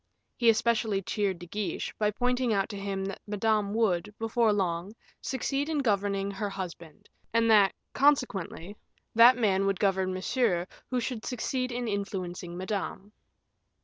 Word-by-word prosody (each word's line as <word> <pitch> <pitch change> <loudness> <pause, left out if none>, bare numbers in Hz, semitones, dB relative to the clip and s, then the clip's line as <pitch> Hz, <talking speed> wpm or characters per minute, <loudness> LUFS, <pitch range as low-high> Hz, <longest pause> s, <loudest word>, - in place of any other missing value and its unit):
He 235 -2 +4
especially 220 -3 +2
cheered 200 -1 -1
De 175 - -10
Guiche, 205 +3 -3
by 210 -1 +3
pointing 245 +3 0
out 200 0 +1
to 210 - -6
him 195 -1 -3
that 195 - -6
Madame 210 0 +1
would, 210 -4 +1
before 225 0 +2
long, 190 0 -1 0.3
succeed 275 +3 -2
in 315 - 0
governing 200 -5 0
her 205 +1 -3
husband, 175 -5 -8 0.3
and 230 0 +4
that, 205 -3 +5 0.2
consequently, 210 - +1 0.4
that 235 +2 +8
man 195 -4 +2
would 195 -2 0
govern 190 -2 +1
Monsieur 185 -1 0 0.2
who 255 - 0
should 235 -2 -4
succeed 255 +1 -2
in 240 0 -3
influencing 185 -4 -4
Madame. 195 +1 -4
205 Hz, 145 wpm, -29 LUFS, 195-230 Hz, 0.4 s, that